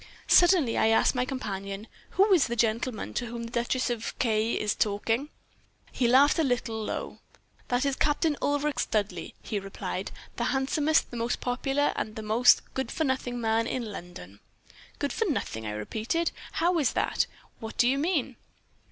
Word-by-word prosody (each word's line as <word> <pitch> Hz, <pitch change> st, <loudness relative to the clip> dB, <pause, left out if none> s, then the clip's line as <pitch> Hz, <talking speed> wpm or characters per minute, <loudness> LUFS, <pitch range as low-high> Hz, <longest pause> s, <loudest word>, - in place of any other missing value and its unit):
Suddenly 350 Hz, -9 st, +5 dB
I -, -, +4 dB
asked 225 Hz, 0 st, +4 dB
my 250 Hz, -1 st, 0 dB
companion, 200 Hz, -6 st, -5 dB, 0.3 s
'Who 395 Hz, +1 st, +5 dB
is 340 Hz, -6 st, +4 dB
the 235 Hz, -, -2 dB
gentleman 230 Hz, 0 st, -1 dB
to 245 Hz, -, -2 dB
whom 235 Hz, 0 st, -5 dB
the 230 Hz, -, -7 dB
Duchess 245 Hz, +2 st, 0 dB
of 230 Hz, -2 st, -4 dB
K 220 Hz, -1 st, +1 dB
is 210 Hz, -, 0 dB
talking?' 225 Hz, +7 st, 0 dB, 0.6 s
"He 245 Hz, -, +1 dB
laughed 275 Hz, +6 st, +5 dB
a -, -, +4 dB
little, 230 Hz, -4 st, -1 dB
low -, -, -3 dB
laugh. -, -, -15 dB, 0.5 s
"'That 245 Hz, +2 st, +1 dB
is 275 Hz, -1 st, +1 dB
Captain 295 Hz, +1 st, +2 dB
Ulric 290 Hz, -2 st, 0 dB
Studleigh,' 195 Hz, -6 st, -1 dB
he 210 Hz, -, -2 dB
replied, 195 Hz, 0 st, -5 dB, 0.3 s
'the -, -, 0 dB
handsomest, 290 Hz, +3 st, +1 dB
the 240 Hz, -, -6 dB
most 235 Hz, +1 st, -1 dB
popular, 270 Hz, +3 st, 0 dB
and 215 Hz, -, -3 dB
the 220 Hz, -, -6 dB
most 225 Hz, +4 st, +5 dB
good 265 Hz, -3 st, -3 dB
for 320 Hz, -, -1 dB
nothing 260 Hz, -3 st, -1 dB
man 225 Hz, 0 st, +1 dB
in 235 Hz, -4 st, -3 dB
London.' 105 Hz, -, -10 dB, 0.6 s
"'Good 285 Hz, -, -2 dB
for 450 Hz, -, 0 dB
nothing,' 110 Hz, -, -2 dB
I -, -, -2 dB
repeated; 220 Hz, -, -2 dB, 0.2 s
'how 345 Hz, +1 st, +2 dB
is 275 Hz, -6 st, +1 dB
that? -, -, +1 dB, 0.3 s
What 220 Hz, -1 st, -8 dB
do 240 Hz, -, +4 dB
you 270 Hz, +2 st, +2 dB
mean?' 290 Hz, -6 st, 0 dB
245 Hz, 180 wpm, -28 LUFS, 220-280 Hz, 0.6 s, Suddenly